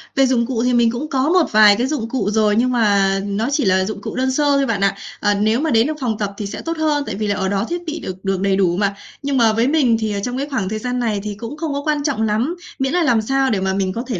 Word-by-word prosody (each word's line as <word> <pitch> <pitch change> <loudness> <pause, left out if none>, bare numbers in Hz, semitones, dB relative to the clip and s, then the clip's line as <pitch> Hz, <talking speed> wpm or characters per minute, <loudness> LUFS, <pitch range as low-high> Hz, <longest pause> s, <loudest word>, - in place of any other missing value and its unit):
Về 270 - +4
dụng 245 -3 +1
cụ 235 -2 -2
thì 250 0 +1
mình 235 -1 +3
cũng 255 +6 -5
có 270 +3 +1
một 360 -2 +2
vài 210 -1 +7
cái 245 +5 -1
dụng 265 -7 -3
cụ 220 -6 -1
rồi, 210 -1 +2
nhưng 250 +2 +2
mà 200 -4 +2
nó 205 +3 -2
chỉ 285 -5 +1
là 190 0 +2
dụng 210 -1 -5
cụ - - -6
đơn 260 +1 0
sơ 295 +3 0
thôi 275 - +2
bạn 210 -5 -1
ạ. 195 0 +2 0.2
Ờ, 205 0 +2
nếu 215 +4 +1
mà 320 - 0
đến 230 +3 +3
được 310 - -1
phòng 225 -4 -1
tập 200 -2 -3
thì 210 - -4
sẽ 200 - -6
tốt 330 0 -4
hơn, 300 -2 +1
tại 215 - -4
vì 215 0 -2
là 205 - 0
ở 190 -1 -1
đó 200 +2 0
thiết 345 0 -3
bị 320 +1 -4
được 185 +1 -8
được 195 -1 -1
đầy 195 -1 +2
đủ 180 -2 +1
mà, 200 -1 0 0.3
nhưng 280 -1 0
mà 225 -2 +4
với 230 +3 +1
mình 275 -7 +3
thì, 215 -1 -2
ờ, 200 - -2
trong 250 +1 -3
cái 280 - -3
khoảng 205 -9 -2
thời 215 +1 -3
gian 250 +2 -3
này 220 -4 -1
thì 210 -1 -5
cũng 235 +7 -7
không 310 -3 -3
có 285 - -2
quan 300 -2 0
trọng 285 -7 -1
lắm, 220 +10 0 0.2
miễn 270 +3 0
là 355 - +2
làm 235 -7 +3
sao 270 +3 +1
để 200 - 0
mà 190 0 -1
mình 190 -1 -1
có 235 - -4
thể 225 -8 -3
230 Hz, 320 wpm, -19 LUFS, 205-270 Hz, 0.3 s, vài